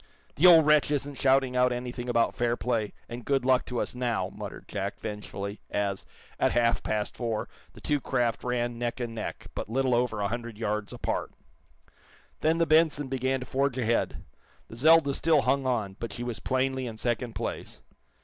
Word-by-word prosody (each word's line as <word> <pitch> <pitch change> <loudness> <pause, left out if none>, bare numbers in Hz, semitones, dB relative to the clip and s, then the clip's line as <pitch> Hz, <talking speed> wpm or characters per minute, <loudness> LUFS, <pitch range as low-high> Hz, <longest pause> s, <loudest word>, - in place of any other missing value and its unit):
"The 180 - +5
old 165 -3 +8
wretch 150 -1 +4
isn't 145 -1 -2
shouting 135 -1 +3
out 125 0 +4
anything 125 0 -4
about 115 -1 +2
fair 120 0 0
play 115 -4 -1 0.2
and 120 0 -7
good 135 -1 +1
luck 130 -1 +3
to 125 -2 -2
us, - - -2
now," 120 -7 -1
muttered - - -8
Jack, 100 0 -4
vengefully, 105 -1 -6
as, 100 -1 -2 0.3
at - - +2
half 120 -1 +2
past 105 -1 -2
four, 115 -3 -2 0.3
the - - -14
two 145 -2 0
craft 120 -3 0
ran 120 -1 -1
neck 120 +2 -2
and 120 -2 -3
neck, 110 -1 -5
but - - -5
little 130 +2 +1
over 120 -3 +1
a 100 - +1
hundred 120 0 -5
yards 105 -2 -2
apart. - - -3 1.1
Then 160 +1 +2
the 165 - +3
"Benson" 155 -3 +3
began 130 0 0
to - - -5
forge 135 -1 0
ahead. 115 -2 0 0.5
The - - -9
"Zelda" 155 +2 +5
still 155 0 +3
hung 135 -1 +1
on, 105 -6 -1
but 115 -3 -4
she 120 +4 -6
was 120 -2 -4
plainly 130 0 0
in 110 -2 -7
second 120 0 -2
place. - - -5
125 Hz, 190 wpm, -28 LUFS, 115-135 Hz, 1.1 s, old